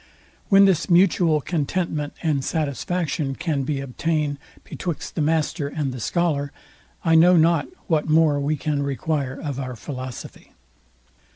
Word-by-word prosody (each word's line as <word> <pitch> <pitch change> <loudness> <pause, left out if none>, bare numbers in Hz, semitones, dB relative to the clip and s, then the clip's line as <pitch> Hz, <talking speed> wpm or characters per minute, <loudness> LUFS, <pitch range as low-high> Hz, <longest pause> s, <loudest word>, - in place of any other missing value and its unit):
When 195 0 +7
this 185 -3 +2
mutual 175 -3 +4
contentment 155 -1 -2
and 150 -5 +1
satisfaction 155 -1 -2
can 150 -3 -1
be 135 +1 -2
obtained 145 +2 -2 0.2
betwixt 175 -4 -5
the 160 - -2
master 155 0 0
and 140 -4 -3
scholar, 145 -2 0 0.5
I 165 - +3
know 175 +2 +6
not 165 -2 +3 0.2
what 155 -1 0
more 155 -2 +4
we 145 +2 0
can 145 0 -1
require 140 -1 -2
of 140 -3 -4
our 130 -2 -5
philosophy. 130 0 -8
150 Hz, 130 wpm, -23 LUFS, 140-165 Hz, 0.5 s, When